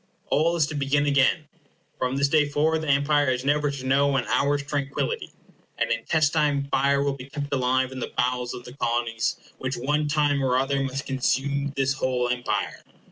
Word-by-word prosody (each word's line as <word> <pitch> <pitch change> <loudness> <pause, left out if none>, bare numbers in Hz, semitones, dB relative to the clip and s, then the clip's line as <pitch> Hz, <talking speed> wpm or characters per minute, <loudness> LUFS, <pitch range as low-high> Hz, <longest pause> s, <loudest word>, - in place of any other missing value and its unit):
All 165 +3 +3
is 160 -3 +3
to 150 - -6
begin 145 0 +1
again. 140 +2 +2 0.5
From 130 +1 -1
this 140 +1 +2
day 150 0 +3
forward 155 +2 +1
the 155 - -5
Empire 145 0 +3
is 125 0 -1
never 145 +1 +2
to 140 -2 -6
know 140 +1 +3
an 125 - 0
hour's 140 0 +1
tranquillity. 145 - -2 0.5
An - - 0
intestine 150 -3 +1
fire 140 +1 +2
will 140 -1 0
be 135 0 -10
kept 145 0 -5
alive 130 0 +1
in 130 - -6
the - - -5
bowels 125 0 0
of 120 - -9
the 125 - -11
Colonies, 120 -4 -1 0.2
which 130 0 -3
one 150 +4 0
time 145 -2 +1
or 130 -1 +2
other 135 +1 0
must 135 +1 -3
consume 140 +2 0
this 135 0 +1
whole 125 -2 -1
Empire. 125 0 -2
140 Hz, 190 wpm, -25 LUFS, 130-145 Hz, 0.5 s, All